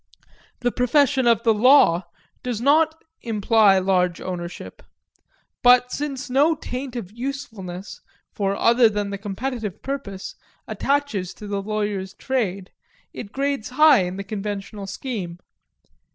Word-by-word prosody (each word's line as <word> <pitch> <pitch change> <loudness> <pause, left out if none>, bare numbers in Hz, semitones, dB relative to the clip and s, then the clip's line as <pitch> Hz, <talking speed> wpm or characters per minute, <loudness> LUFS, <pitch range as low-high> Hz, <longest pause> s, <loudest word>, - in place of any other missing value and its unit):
The 245 -1 +1
profession 260 +1 +2
of 230 -1 +3
the 225 -2 +4
law 210 -7 +5 0.3
does 245 -4 -3
not 315 +5 +2 0.2
imply 215 -2 +3
large 185 -2 +1
ownership; 175 -1 -7 0.8
but 250 0 +5
since 280 -2 -4
no 285 +5 +3
taint 255 -3 -6
of 205 -6 -6
usefulness, 220 -7 -6 0.3
for 200 -1 -1
other 235 +2 +4
than 205 -1 -3
the 200 - -5
competitive 215 +1 -5
purpose, 265 -9 -5 0.3
attaches 275 -11 -1
to 210 - -10
the 200 -1 -3
lawyer's 205 -2 -3
trade, 200 -8 -2 0.4
it 200 - -8
grades 275 -3 -2
high 285 -2 +6
in 180 +1 -5
the 200 - -4
conventional 200 0 -5
scheme. 195 -5 -5
220 Hz, 125 wpm, -23 LUFS, 195-265 Hz, 0.8 s, high